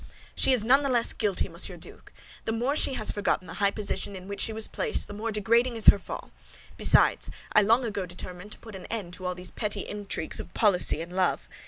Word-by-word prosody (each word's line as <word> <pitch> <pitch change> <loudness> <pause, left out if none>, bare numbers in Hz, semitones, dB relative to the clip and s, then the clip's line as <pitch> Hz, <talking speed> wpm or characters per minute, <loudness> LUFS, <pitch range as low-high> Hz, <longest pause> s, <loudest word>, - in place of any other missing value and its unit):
"She - - +3
is 240 -4 +4
not 270 +4 +5
the 280 - -1
less 240 -2 +1
guilty, 200 -3 0
Monsieur - - -3
Duke! - - -11 0.3
The - - -1
more 245 +6 0
she 270 - +3
has 215 - +1
forgotten 205 -2 -1
the - - -8
high 200 - +5
position 200 -1 -2
in 185 0 -9
which 200 0 -4
she - - +2
was 220 0 +3
placed, 460 -3 -1
the - - -8
more 220 +2 -3
degrading 230 +4 +2
is 225 - +1
her 200 - +6
fall. - - -8 0.4
Besides, - - +4 0.2
I 215 - +7
long 230 +5 +3
ago 200 -4 -3
determined 180 +3 -8
to - - -11
put 225 -2 -12
an 190 - -9
end 200 -6 -5
to 185 0 -4
all 180 - -2
these 180 0 -4
petty 210 -2 -2
intrigues 205 -6 -5
of - - -9
policy 185 -6 +1
and 175 +2 -8
love. 185 -2 +1
210 Hz, 230 wpm, -27 LUFS, 185-230 Hz, 0.4 s, I